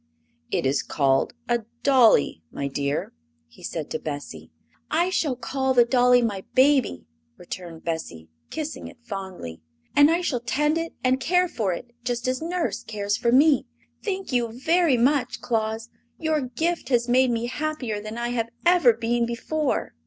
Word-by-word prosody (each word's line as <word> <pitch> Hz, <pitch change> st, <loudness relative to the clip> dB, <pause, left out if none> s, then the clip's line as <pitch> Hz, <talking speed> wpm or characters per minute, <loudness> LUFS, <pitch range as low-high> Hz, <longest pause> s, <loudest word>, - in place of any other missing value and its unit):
"It -, -, -1 dB
is 135 Hz, +1 st, +2 dB
called 135 Hz, -2 st, +1 dB
a 240 Hz, 0 st, +2 dB, 0.2 s
dolly, 240 Hz, -, +4 dB
my 140 Hz, -, -3 dB
dear," 140 Hz, +1 st, -2 dB, 0.3 s
he 80 Hz, -, -19 dB
said -, -, -5 dB
to -, -, -2 dB
Bessie. 145 Hz, -2 st, -7 dB, 0.4 s
"I 345 Hz, +4 st, +1 dB
shall 300 Hz, -8 st, 0 dB
call 265 Hz, +1 st, -1 dB
the 240 Hz, -1 st, +6 dB
dolly 245 Hz, 0 st, +4 dB
my 200 Hz, -4 st, -2 dB
baby," 260 Hz, -, +3 dB, 0.3 s
returned 170 Hz, -2 st, -8 dB
Bessie, 160 Hz, -, -4 dB, 0.2 s
kissing 310 Hz, -1 st, -5 dB
it -, -, -13 dB
fondly; 190 Hz, -, -7 dB, 0.3 s
"and 290 Hz, +1 st, +7 dB
I 335 Hz, +2 st, +2 dB
shall 275 Hz, -8 st, -1 dB
tend 295 Hz, +7 st, 0 dB
it 330 Hz, 0 st, -5 dB
and 260 Hz, +1 st, +2 dB
care 360 Hz, +5 st, +2 dB
for 215 Hz, -, -1 dB
it 240 Hz, +7 st, -6 dB
just 245 Hz, 0 st, -2 dB
as 255 Hz, +2 st, -1 dB
Nurse 325 Hz, -, -2 dB
cares 205 Hz, -2 st, -2 dB
for 235 Hz, +1 st, +1 dB
me. 280 Hz, +1 st, +5 dB, 0.4 s
Thank 390 Hz, -5 st, -3 dB
you 245 Hz, -2 st, +1 dB
very 325 Hz, -1 st, +3 dB
much, 255 Hz, +1 st, +1 dB
Claus; 225 Hz, -1 st, -2 dB, 0.3 s
your 315 Hz, -2 st, 0 dB
gift 320 Hz, +3 st, -2 dB
has 240 Hz, -2 st, +2 dB
made 255 Hz, +1 st, +4 dB
me 235 Hz, 0 st, -1 dB
happier 255 Hz, -5 st, -3 dB
than 215 Hz, +2 st, -7 dB
I 240 Hz, 0 st, -2 dB
have 230 Hz, -2 st, -1 dB, 0.2 s
ever 345 Hz, -9 st, +6 dB
been 235 Hz, +1 st, 0 dB
before!" 275 Hz, +5 st, -2 dB
245 Hz, 165 wpm, -24 LUFS, 215-290 Hz, 0.4 s, and